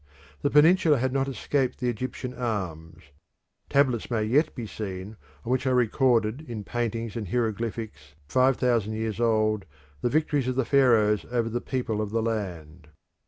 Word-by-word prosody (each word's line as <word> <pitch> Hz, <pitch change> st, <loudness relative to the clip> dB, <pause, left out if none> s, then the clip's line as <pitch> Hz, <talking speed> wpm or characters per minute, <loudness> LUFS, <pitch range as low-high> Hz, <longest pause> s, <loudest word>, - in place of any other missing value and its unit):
The 145 Hz, -, +1 dB
peninsula 155 Hz, +1 st, +5 dB
had 130 Hz, +1 st, -1 dB
not 135 Hz, 0 st, +1 dB
escaped 135 Hz, 0 st, -1 dB
the 125 Hz, -, -2 dB
Egyptian 125 Hz, +2 st, -4 dB
arms; 95 Hz, -10 st, -4 dB, 0.7 s
tablets 130 Hz, -5 st, +2 dB
may 115 Hz, -3 st, 0 dB
yet 145 Hz, +9 st, +2 dB
be 120 Hz, -4 st, -5 dB
seen 100 Hz, -1 st, -6 dB, 0.3 s
on 120 Hz, -, -2 dB
which 130 Hz, +1 st, +1 dB
are 130 Hz, -, +3 dB
recorded 120 Hz, 0 st, +2 dB
in 110 Hz, -3 st, -5 dB
paintings 115 Hz, +1 st, -3 dB
and 110 Hz, -4 st, -4 dB
hieroglyphics 110 Hz, -, -3 dB
five 130 Hz, -, +3 dB
thousand 115 Hz, -4 st, +1 dB
years 110 Hz, 0 st, -3 dB
old 110 Hz, -3 st, +1 dB, 0.4 s
the -, -, +1 dB
victories 145 Hz, -2 st, +1 dB
of 130 Hz, -, -1 dB
the 130 Hz, -1 st, +1 dB
Pharaohs 115 Hz, -7 st, +4 dB
over 120 Hz, -2 st, 0 dB
the 120 Hz, +2 st, -2 dB
people 120 Hz, -5 st, -2 dB
of 105 Hz, -, -3 dB
the 115 Hz, +1 st, -1 dB
land. 90 Hz, -8 st, -4 dB
115 Hz, 165 wpm, -26 LUFS, 105-130 Hz, 0.7 s, peninsula